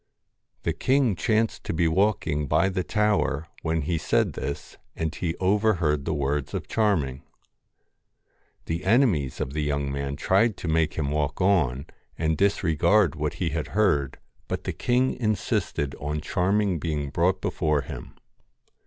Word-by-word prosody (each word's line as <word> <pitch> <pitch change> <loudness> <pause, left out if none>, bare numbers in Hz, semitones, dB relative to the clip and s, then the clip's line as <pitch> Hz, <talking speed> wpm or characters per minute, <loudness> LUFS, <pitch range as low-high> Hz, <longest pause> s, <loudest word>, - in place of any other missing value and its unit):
The 85 - 0
king 130 - +2
chanced 110 +6 0
to - - -2
be 85 0 +2
walking 80 -5 +1
by 80 +7 +3
the 95 -1 -1
tower 105 -8 +1
when 80 -1 -1
he 80 +2 -1
said - - +1
this, 70 +1 -5 0.2
and 80 -1 -2
he 85 -1 -2
overheard 90 -7 +1
the - - -1
words 70 0 -1
of - - -4
Charming. 80 -12 0 1.4
The 85 +2 -3
enemies 100 - +2
of 65 - -3
the 75 - -1
young 70 -1 -1
man 70 0 -3
tried 100 +8 +2
to - - -6
make 80 -1 +1
him 70 -3 -1
walk 75 -1 -1
on, 80 -9 +2 0.3
and 80 -1 +1
disregard 90 -1 +3
what 75 -1 -3
he 90 - -1
had 80 -1 -3
heard, 75 -11 +2 0.3
but - - -3
the - - -3
king 125 +2 +1
insisted 105 - -1
on 75 +1 -2
Charming 95 +4 +1
being 75 -3 -2
brought 90 +4 +1
before 75 -2 0
him. - - -9
80 Hz, 155 wpm, -25 LUFS, 75-100 Hz, 1.4 s, by